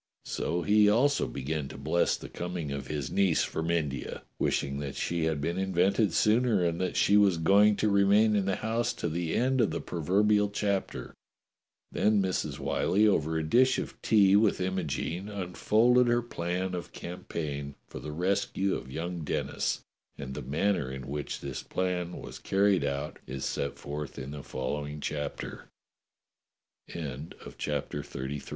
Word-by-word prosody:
So 85 0 -2
he 105 0 +5
also 135 +7 +3
began 70 +1 -3
to - - -9
bless 80 +5 +1
the - - -9
coming 85 -4 -4
of 70 -1 -4
his 75 -3 -3
niece 95 -5 +3
from 80 +1 -3
India, 75 -5 -2 0.2
wishing 70 0 0
that 70 -1 -5
she 85 -2 -1
had 80 -2 0
been 85 +6 -1
invented 95 +2 +2
sooner 110 -3 +3
and 85 +1 0
that 90 - -1
.she 100 - +5
was 100 -4 +5
going 100 +5 +5
to 105 - +1
remain 100 +2 +4
in 100 -2 +2
the 95 -1 +1
house 115 +2 -1
to - - -3
the 85 0 -2
end 130 +1 +2
of 110 - +3
the - - -3
proverbial 105 +5 +2
chapter. 100 -1 -2 0.8
Then 105 0 +3
Mrs. 95 -2 -1
Whyllie, 105 +3 +2
over 80 -5 +2
a 80 - 0
dish 130 +11 +4
of - - -5
tea 100 -3 +5
with 105 0 +4
Imogene, 90 0 -2
unfolded 110 +6 +3
her 120 0 +2
plan 90 -3 -3
of 90 -1 -5
campaign 75 -5 -5
for - - -9
the 75 - -6
rescue 95 +3 0
of 65 - -5
young 85 +4 -4
Denis, 75 - -2 0.4
and 65 -1 -6
the - - -5
manner 75 -2 0
in 65 -1 -6
which 75 +1 -4
this 70 -1 -5
plan 90 -1 -2
was - - -9
carried 95 -3 +2
out 70 0 -3
is 65 +1 -4
set 70 - -2
forth 75 -1 -6
in 70 +1 -6
a 75 - -6
following 75 +3 -4
90 Hz, 155 wpm, -29 LUFS, 75-100 Hz, 0.8 s, he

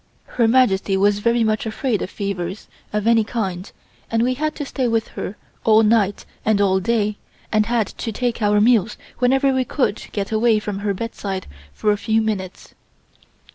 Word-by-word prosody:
Her 235 -2 +1
Majesty 210 -5 +3
was 205 +1 +3
very 235 +2 +2
much 220 0 0
afraid 220 -1 -1
of - - -3
fevers 195 -2 -4 0.2
of 210 0 -1
any 230 -1 +4
kind 195 -4 -4 0.4
and 225 0 +1
we 255 +1 +2
had 305 +3 -2
to 290 - -4
stay 265 -2 -1
with 225 -1 0
her 205 - -6 0.3
all 220 0 +5
night 210 -2 +2 0.2
and 215 -2 +2
all 190 -1 +3
day 210 0 0 0.3
and 215 0 +2
had 235 -2 +1
to 225 - -6
take 240 +1 -2
our 210 0 +3
meals 225 -1 +3 0.2
whenever 265 +2 +3
we 260 0 +1
could 250 -4 -1
get 200 0 -3
away 220 0 +3
from 210 -2 -4
her 200 -1 -1
bedside 195 -3 -4 0.3
for 210 - 0
a 205 - +1
few 220 0 +2
minutes. 205 -4 -4
220 Hz, 180 wpm, -21 LUFS, 205-235 Hz, 0.4 s, all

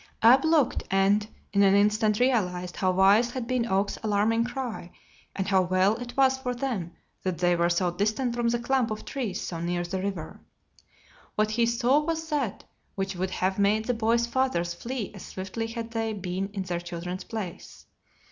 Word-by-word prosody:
Ab 255 +4 +7
looked 320 -4 +3
and, 200 +2 +3 0.3
in 200 - +4
an 195 0 +5
instant, 210 +1 +3
realized 180 -8 0
how 185 - +1
wise 195 +6 +5
had 245 -1 -4
been 245 -1 0
Oak's 195 0 0
alarming 220 +2 +2
cry 245 -8 -5 0.5
and 190 -1 -2
how 190 -2 +4
well 185 +3 +2
it 245 +1 -8
was 265 -1 +4
for 250 -2 -3
them 225 -10 -3 0.3
that 185 -3 -2
they 175 +1 +3
were 170 0 +2
so 175 +1 +1
distant 220 +6 -1
from 240 -1 0
the 240 - +1
clump 245 0 +1
of 215 0 -5
trees 240 -9 -3
so 170 - -5
near 175 +1 -1
the 185 +2 -3
river. 190 -5 -5 1.0
What 215 0 +1
he 230 +1 +2
saw 240 +4 +3
was 320 +1 -3
that 275 -9 -1 0.3
which 195 0 -2
would 185 +1 -2
have 190 +1 -1
made 210 +2 +2
the 245 - +1
boys' 230 +1 +2
fathers 235 -9 0
flee 230 +4 -5
as 200 - -10
swiftly 195 +4 -5
had 230 0 -6
they 225 -1 -1
been 190 -1 -3
in 200 -2 -3
their 175 -2 -3
children's 175 +1 -6
place. 205 -6 -7
210 Hz, 185 wpm, -27 LUFS, 185-240 Hz, 1.0 s, Ab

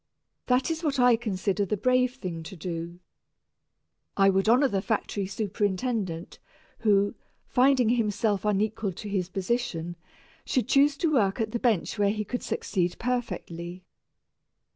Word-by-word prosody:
That 255 +5 +2
is 325 +1 -3
what 285 -4 0
I 245 -1 +6
consider 205 -3 -1
the 205 +2 -1
brave 255 +3 +2
thing 180 -9 -5
to 160 +4 -9
do. 170 0 -5 1.2
I 195 0 +5
would 195 +3 +2
honor 255 +4 +5
the 200 -6 -1
factory 205 -2 -2
superintendent, 200 -2 -2 0.4
who, 205 -3 +3 0.3
finding 255 -2 +3
himself 210 -3 +1
unequal 210 -1 0
to 210 - -8
his 190 -3 -1
position, 190 -4 -2 0.5
should 255 - 0
choose 280 +2 +4
to 320 -1 +1
work 200 -6 +2
at 220 -1 -1
the 235 - -2
bench 225 -3 0
where 200 -1 +4
he 210 +1 -2
could 245 +4 -3
succeed 180 -3 -1
perfectly. 180 -7 -4
210 Hz, 140 wpm, -27 LUFS, 190-245 Hz, 1.2 s, I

